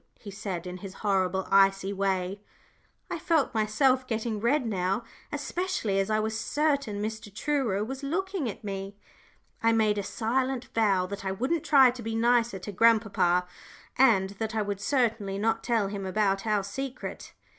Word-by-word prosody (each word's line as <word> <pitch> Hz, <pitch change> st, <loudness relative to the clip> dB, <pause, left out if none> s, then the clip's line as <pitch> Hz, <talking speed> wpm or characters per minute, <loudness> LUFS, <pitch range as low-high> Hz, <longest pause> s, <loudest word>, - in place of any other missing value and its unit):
he 205 Hz, -, -9 dB
said, 190 Hz, -4 st, -5 dB
in 180 Hz, 0 st, -6 dB
his 190 Hz, +1 st, -9 dB
horrible, 190 Hz, -1 st, +1 dB
icy 195 Hz, 0 st, +4 dB
way. 195 Hz, 0 st, -1 dB, 0.7 s
I -, -, -2 dB
felt 320 Hz, -6 st, +1 dB
myself 255 Hz, +4 st, +2 dB
getting 225 Hz, -2 st, -2 dB
red 250 Hz, +5 st, +1 dB
now, 195 Hz, 0 st, -1 dB, 0.3 s
especially 290 Hz, -, -1 dB
as 195 Hz, +1 st, 0 dB
I 215 Hz, 0 st, +2 dB
was 220 Hz, +1 st, -2 dB
certain 280 Hz, -8 st, 0 dB
Mr. 220 Hz, -1 st, -5 dB
Truro 225 Hz, -3 st, 0 dB
was 265 Hz, +5 st, -5 dB
looking 340 Hz, -, -2 dB
at 205 Hz, -, -8 dB
me. 195 Hz, 0 st, -5 dB, 0.7 s
I 230 Hz, 0 st, +4 dB
made 215 Hz, -2 st, +2 dB
a -, -, -2 dB
silent 255 Hz, +5 st, -1 dB
vow 200 Hz, -5 st, +2 dB
that 200 Hz, +2 st, -6 dB
I 190 Hz, -, -1 dB
wouldn't 260 Hz, -, -1 dB
try 265 Hz, -4 st, +6 dB
to 245 Hz, 0 st, -9 dB
be 225 Hz, 0 st, -3 dB
nicer 235 Hz, -2 st, +2 dB
to 190 Hz, +3 st, -7 dB
grandpapa, 200 Hz, -4 st, +3 dB, 0.5 s
and 200 Hz, -7 st, +4 dB
that 220 Hz, 0 st, -2 dB
I 215 Hz, -, +1 dB
would 200 Hz, -1 st, -4 dB
certainly 220 Hz, -6 st, 0 dB
not 225 Hz, +2 st, 0 dB
tell 230 Hz, -4 st, +1 dB
him 195 Hz, -1 st, -5 dB
about 195 Hz, +1 st, 0 dB
our 210 Hz, -2 st, +2 dB
secret. 260 Hz, +6 st, -6 dB
215 Hz, 165 wpm, -28 LUFS, 195-245 Hz, 0.7 s, try